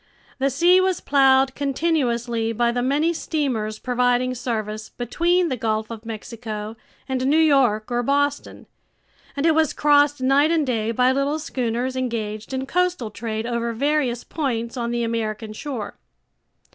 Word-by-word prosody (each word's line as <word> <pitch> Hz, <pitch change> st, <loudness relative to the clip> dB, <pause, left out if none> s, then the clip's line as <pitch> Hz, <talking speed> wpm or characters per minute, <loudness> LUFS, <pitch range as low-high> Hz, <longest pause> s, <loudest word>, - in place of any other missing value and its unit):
The 275 Hz, +1 st, +2 dB
sea 345 Hz, +7 st, +4 dB
was 375 Hz, -1 st, +1 dB
plowed 270 Hz, -1 st, +4 dB
continuously 250 Hz, -6 st, 0 dB
by 235 Hz, +1 st, +1 dB
the 245 Hz, +1 st, -1 dB
many 290 Hz, +6 st, +1 dB
steamers 250 Hz, -10 st, -2 dB
providing 250 Hz, +1 st, +1 dB
service 215 Hz, -3 st, -4 dB
between 345 Hz, +9 st, 0 dB
the 260 Hz, -, -1 dB
Gulf 220 Hz, -1 st, -2 dB
of 225 Hz, 0 st, -8 dB
Mexico 220 Hz, -1 st, -6 dB, 0.3 s
and 260 Hz, -1 st, -1 dB
New 295 Hz, +3 st, +3 dB
York 260 Hz, -8 st, +3 dB
or 240 Hz, 0 st, +1 dB
Boston, 285 Hz, +3 st, -1 dB, 0.7 s
and 280 Hz, -, 0 dB
it 325 Hz, -, +5 dB
was 315 Hz, -1 st, +2 dB
crossed 290 Hz, -1 st, +3 dB
night 275 Hz, +4 st, +3 dB
and 325 Hz, -3 st, +2 dB
day 225 Hz, -4 st, -1 dB
by 250 Hz, +3 st, +3 dB
little 275 Hz, +3 st, 0 dB
schooners 255 Hz, -3 st, -2 dB
engaged 220 Hz, -4 st, -3 dB
in 265 Hz, 0 st, -2 dB
coastal 360 Hz, -7 st, 0 dB
trade 220 Hz, 0 st, -4 dB
over 235 Hz, -1 st, -2 dB
various 265 Hz, -1 st, 0 dB
points 235 Hz, -6 st, -3 dB
on 235 Hz, -2 st, -2 dB
the 240 Hz, 0 st, -1 dB
American 220 Hz, -1 st, -3 dB
shore. 240 Hz, -3 st, -6 dB
250 Hz, 150 wpm, -22 LUFS, 230-285 Hz, 0.7 s, it